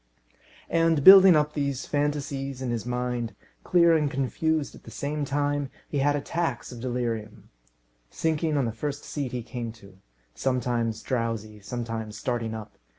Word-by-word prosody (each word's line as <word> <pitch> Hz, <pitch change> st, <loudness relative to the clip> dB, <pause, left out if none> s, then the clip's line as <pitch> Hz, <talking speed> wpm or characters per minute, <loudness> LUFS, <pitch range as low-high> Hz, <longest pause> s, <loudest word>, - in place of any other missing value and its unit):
And, 165 Hz, -3 st, +3 dB
building 190 Hz, -1 st, +10 dB
up 150 Hz, 0 st, +2 dB
these 140 Hz, -3 st, -2 dB
fantasies 145 Hz, -2 st, -2 dB
in 130 Hz, -2 st, -2 dB
his 120 Hz, 0 st, -3 dB
mind, 125 Hz, -1 st, -2 dB, 0.3 s
clear 170 Hz, -2 st, +5 dB
and 150 Hz, -2 st, +2 dB
confused 145 Hz, +3 st, -1 dB
at -, -, -14 dB
the -, -, -12 dB
same 145 Hz, +1 st, -3 dB
time, 145 Hz, 0 st, -1 dB, 0.2 s
he 145 Hz, -, -1 dB
had 145 Hz, +1 st, +3 dB
attacks 145 Hz, -2 st, -2 dB
of 120 Hz, -, -8 dB
delirium, 115 Hz, -4 st, -4 dB, 0.6 s
sinking 160 Hz, -, 0 dB
on 135 Hz, -, +2 dB
the 115 Hz, -, -1 dB
first 145 Hz, +6 st, -4 dB
seat 140 Hz, -4 st, -4 dB
he 125 Hz, -2 st, -4 dB
came 120 Hz, -1 st, -5 dB
to; 100 Hz, -4 st, -17 dB, 0.3 s
sometimes 120 Hz, -3 st, -1 dB
drowsy, 115 Hz, -4 st, -2 dB
sometimes 115 Hz, 0 st, -5 dB
starting 115 Hz, -3 st, -2 dB
up. 110 Hz, -1 st, -9 dB
135 Hz, 150 wpm, -26 LUFS, 115-145 Hz, 0.6 s, building